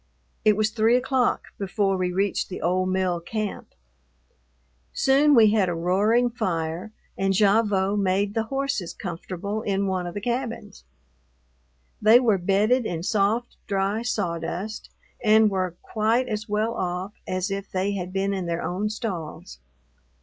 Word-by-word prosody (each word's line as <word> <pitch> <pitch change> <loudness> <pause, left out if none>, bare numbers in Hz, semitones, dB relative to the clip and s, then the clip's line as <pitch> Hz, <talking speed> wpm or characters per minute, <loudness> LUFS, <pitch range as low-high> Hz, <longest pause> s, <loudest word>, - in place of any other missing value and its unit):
It 210 -1 +4
was 215 0 +1
three 225 +2 +3
o'clock 255 0 +1
before 195 0 0
we 180 -1 -1
reached 195 +2 0
the 185 - -6
old 185 +2 0
mill 185 -2 0
camp. 210 +4 -5 1.2
Soon 280 +2 +4
we 220 -3 +7
had 205 -4 +2
a 175 - -2
roaring 210 +8 +2
fire, 170 -1 -3 0.3
and 195 0 +1
Gavotte 205 -1 +3
made 195 +1 +1
the 225 0 0
horses 270 -7 -2
comfortable 185 +3 -5
in 200 -2 0
one 185 -2 -1
of 175 - -7
the - - -2
cabins. 235 -2 -4 1.2
They 220 +3 +7
were 220 -6 +2
bedded 210 +7 +2
in 165 -1 -4
soft, 215 +4 0
dry 200 +2 0
sawdust, 200 -2 -3 0.3
and 215 -1 +5
were 185 -3 -1
quite 225 +4 +1
as 215 0 -4
well 215 +2 0
off 185 0 -3
as 185 +2 -2
if 195 0 -4
they 190 +2 -1
had 185 -2 -4
been 195 +1 0
in 190 -3 -3
their 170 0 -2
own 185 +6 -2
stalls. 180 - -6
200 Hz, 150 wpm, -25 LUFS, 185-220 Hz, 1.2 s, we